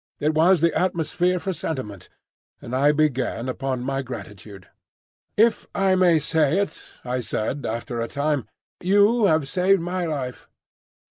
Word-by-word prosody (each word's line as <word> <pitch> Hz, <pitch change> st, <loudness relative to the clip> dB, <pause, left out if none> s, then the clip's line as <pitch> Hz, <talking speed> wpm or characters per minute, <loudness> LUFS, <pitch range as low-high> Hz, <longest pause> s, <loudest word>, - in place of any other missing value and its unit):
It 150 Hz, +2 st, +1 dB
was 165 Hz, +2 st, +4 dB
the 170 Hz, 0 st, +3 dB
atmosphere 180 Hz, 0 st, 0 dB
for 190 Hz, +2 st, -3 dB
sentiment, 120 Hz, -, -5 dB, 0.5 s
and 120 Hz, -, -6 dB
I 140 Hz, +3 st, +4 dB
began 135 Hz, -5 st, 0 dB
upon 130 Hz, -1 st, -3 dB
my 135 Hz, +1 st, -1 dB
gratitude. 105 Hz, -6 st, -9 dB, 0.7 s
"If 225 Hz, +1 st, +3 dB
I 195 Hz, -1 st, +3 dB
may 180 Hz, -3 st, +4 dB
say 155 Hz, +1 st, +1 dB
it," 200 Hz, 0 st, 0 dB
said 125 Hz, +1 st, -4 dB
I, 110 Hz, -, -1 dB
after 120 Hz, 0 st, -5 dB
a 115 Hz, -, -2 dB
time, 145 Hz, -3 st, -1 dB, 0.3 s
"you 205 Hz, +5 st, +4 dB
have 155 Hz, -6 st, +2 dB
saved 185 Hz, +6 st, +2 dB
my 175 Hz, +1 st, -2 dB
life." 135 Hz, -5 st, -5 dB
150 Hz, 145 wpm, -23 LUFS, 130-180 Hz, 0.7 s, was